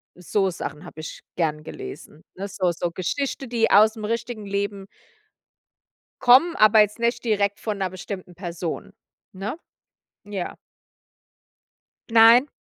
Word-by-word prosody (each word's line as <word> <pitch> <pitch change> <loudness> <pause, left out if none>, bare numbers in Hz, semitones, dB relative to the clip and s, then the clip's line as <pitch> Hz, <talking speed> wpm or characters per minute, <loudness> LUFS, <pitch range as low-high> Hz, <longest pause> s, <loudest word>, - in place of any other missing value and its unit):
so 190 +2 0
Sachen 150 -4 -6
habe - - -11
ich - - -8 0.2
gerne 155 -3 -1
gelesen, 390 - -9
ne? 195 +2 -5
So 185 -2 0
so 170 0 -3
Geschichte, 270 +10 -3
die 230 -1 +1
ausm 215 +1 +5
richtigen 230 -1 -3
Leben 200 0 -3 1.4
kommen, 265 +8 +6
aber 215 +1 +6
jetzt 210 +2 0
nicht 235 +1 0
direkt 205 -2 +1
von 215 -2 -3
'ner 190 -1 -1
bestimmten 185 -1 -8
Person, 170 -2 -5 0.4
ne? 200 - -5 0.7
Ja. 200 -3 -5 1.5
Nein. 230 +4 +7
205 Hz, 125 wpm, -24 LUFS, 180-230 Hz, 1.5 s, Nein